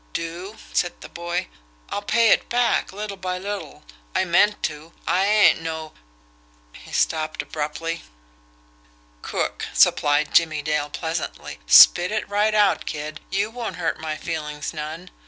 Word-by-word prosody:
"Do?" 175 +6 -5 0.2
said 175 - 0
the - - -10
boy. 175 +1 -3 0.4
"I'll 205 - -2
pay 230 +2 +3
it - - +3
back, 240 0 +1
little 200 0 -6
by 185 -1 -3
little. 200 +2 -6 0.3
I - - +2
meant 205 +4 +3
to. 155 +2 -4
I 190 +2 +2
ain't 210 -5 +5
no 160 -1 -5 0.4
" - - -34
He - - -14
stopped 155 -1 0
abruptly. 160 +2 -4 1.2
"Crook," - - -3
supplied 145 +1 +3
Jimmie 155 -3 +3
Dale 150 -1 -1
pleasantly. 160 - -5
"Spit 175 - +8
it 215 0 -2
right 210 +1 +1
out, 205 -2 +3
kid; 150 -1 -5
you 200 +3 -1
won't 240 -1 -5
hurt 170 -2 -2
my 155 -1 -4
feelings 150 -2 -5
none. 160 +4 -7
170 Hz, 145 wpm, -23 LUFS, 155-200 Hz, 1.2 s, Spit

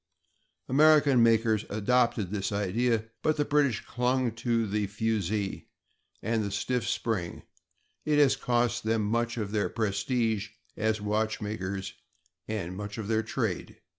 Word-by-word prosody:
American 145 -2 +5
makers 115 -2 +3
adopted 110 -2 +1
this 100 -1 -2
idea, 110 +3 0 0.2
but 155 0 +1
the 145 - +1
British 145 -6 +1
clung 125 0 0
to 115 0 0
the 105 0 -1
fusee 105 -1 -2 0.6
and 110 0 0
the 100 - -2
stiff 120 +4 -1
spring; 95 -7 -2 0.6
it 150 -1 +1
has 140 -2 +5
cost 120 -2 0
them 110 0 +1
much 115 +2 0
of 105 -3 -3
their 105 -1 0
prestige 110 0 -1 0.3
as 110 0 0
watchmakers 105 -2 -2 0.5
and 95 -5 -3
much 105 +2 -6
of 110 -3 -4
their 110 -1 +2
trade. 110 -4 -3
110 Hz, 135 wpm, -28 LUFS, 105-120 Hz, 0.6 s, American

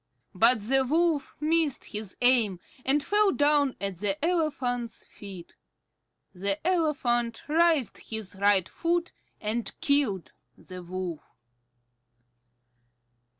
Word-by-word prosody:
But 230 +4 +4
the 265 +4 +3
Wolf 315 +1 +1
missed 310 -1 +1
his 210 -3 -6
aim, 235 -7 +4 0.2
and 280 +2 +2
fell 415 +2 +3
down 290 -4 +2
at 195 -2 -3
the 210 - -1
elephant's 255 -9 -1
feet. 190 -4 -11 0.8
The 195 +2 -1
elephant 250 -10 0
raised 320 -4 +2
his 220 -3 -4
right 195 -2 +3
foot 345 +1 -1 0.3
and 220 +2 -3
killed 280 - 0 0.2
the 185 -1 -10
Wolf. 180 -2 -6
245 Hz, 105 wpm, -27 LUFS, 200-300 Hz, 0.8 s, But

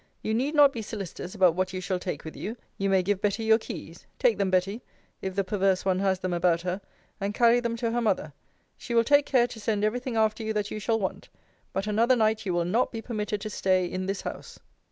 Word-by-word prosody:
You 220 - -1
need 270 +7 0
not 285 -2 +7
be 230 - -4
solicitous 200 -3 -6
about 185 -4 +5
what 185 +2 -1
you 185 - -3
shall 185 0 -2
take 180 -5 -5
with 160 - -7
you: 225 +4 -5 0.2
you 195 0 +1
may 190 -1 +3
give 200 +1 0
Betty 210 +1 0
your 220 0 +5
keys - - -9
Take - - +2
them, 195 - +2
Betty, 190 +5 0 0.4
if 190 -1 -4
the 195 - +1
perverse 190 -1 +1
one 185 -1 +2
has 190 -1 +2
them 185 -1 -3
about 170 -1 +2
her, 180 +2 -3 0.4
and 200 +1 -2
carry 240 0 +5
them 235 -1 -2
to 230 -1 -1
her 240 +1 0
mother. 185 -9 0 0.5
She 235 - -4
will 230 - +5
take 285 +3 +4
care 250 -3 +4
to 240 -2 -8
send 210 -1 -1
every 215 +4 +1
thing 250 -2 -4
after 220 0 +2
you 220 0 -2
that 210 -1 -2
you 215 - -4
shall 225 +2 0
want 190 - -4 0.4
but 195 +1 -2
another 225 +4 +3
night 220 -2 +1
you 180 - 0
will 170 -1 +1
not 220 +8 +1
be 230 - -5
permitted 210 -3 -3
to 215 0 -5
stay 185 -2 +2
in 185 +1 -4
this 195 0 -2
house. - - -7
210 Hz, 250 wpm, -27 LUFS, 185-230 Hz, 0.5 s, not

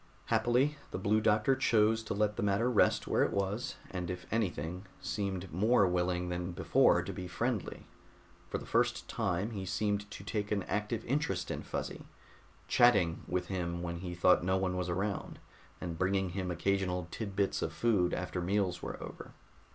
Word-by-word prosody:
Happily, 130 +5 +3
the - - -4
Blue 105 +3 +2
Doctor 110 +5 +3
chose 110 -4 +3
to - - -2
let 105 0 +1
the - - -3
matter 105 +5 +2
rest 115 - +3
where - - +2
it - - +3
was, 100 +4 -1 0.2
and 90 -2 -3
if 90 -1 -5
anything, 90 -3 -2
seemed 95 -4 -3
more 105 +4 +4
willing 90 0 0
than 90 0 -3
before - - +4
to - - -5
be 90 - -5
friendly. 105 +5 -2 0.6
For - - -1
the - - -8
first - - +1
time 95 +6 -1
he 100 -4 -4
seemed 105 +2 -1
to 100 - -8
take 105 0 -3
an 100 -2 +1
active 105 +4 -2
interest 145 +5 -1
in - - -3
Fuzzy, - - -5 0.6
"chatting" 100 -9 +4
with 90 0 -1
him 85 -2 -2
when 85 0 -3
he 90 -1 -5
thought 90 +1 +4
no 95 +1 +2
one 95 -1 0
was 90 -1 -2
around, 100 +3 -2 0.4
and 85 -2 -5
bringing 95 0 +1
him 90 +1 -3
occasional 90 0 0
tid 100 -4 -5
bits 100 -1 +1
of 80 - -1
food 95 0 +2
after 90 0 -2
meals 90 -1 0
were - - -5
over. - - -9
95 Hz, 180 wpm, -32 LUFS, 90-105 Hz, 0.6 s, more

